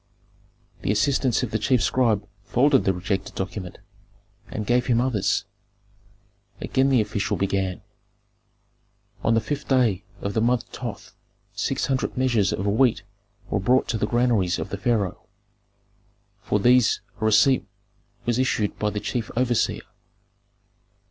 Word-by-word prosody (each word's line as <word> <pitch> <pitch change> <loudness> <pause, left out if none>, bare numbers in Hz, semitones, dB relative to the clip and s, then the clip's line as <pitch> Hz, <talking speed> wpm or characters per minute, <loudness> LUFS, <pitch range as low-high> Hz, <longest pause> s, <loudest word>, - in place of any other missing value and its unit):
The - - 0
assistants 130 +3 +1
of 120 - -3
the 110 - 0
chief 125 +2 +2
scribe 110 -5 +1 0.2
folded 135 +5 +3
the 95 - +4
rejected 95 +2 -3
document, 95 -1 -5 0.7
and 105 - -4
gave 125 +2 +1
him 120 -2 +3
others. 120 -7 0 1.1
Again 135 +1 +1
the 130 -4 +4
official 105 -1 -2
began, 95 -1 -1 1.4
"On 115 - +3
the - - +4
fifth 145 +5 -4
day 120 -8 +2 0.2
of 100 - -3
the 110 - +1
month 120 +1 +2
Thoth 120 -4 -7 0.4
six - - -1
hundred 130 -2 -2
measures 120 -6 +2
of 95 - -2
wheat 110 +4 +2 0.5
were - - +1
brought 125 +7 +2
to 115 - -1
the 105 - 0
granaries 115 -7 +1
of - - -5
the 100 - -3
pharaoh; 105 -4 -1 1.2
for 105 - 0
these 125 +2 +4 0.2
a - - 0
receipt 130 +4 +4 0.6
was 120 +1 0
issued 110 -5 0
by 105 - +1
the 105 0 -3
chief 115 +1 -3
overseer. 125 -2 +1
115 Hz, 140 wpm, -24 LUFS, 100-125 Hz, 1.4 s, the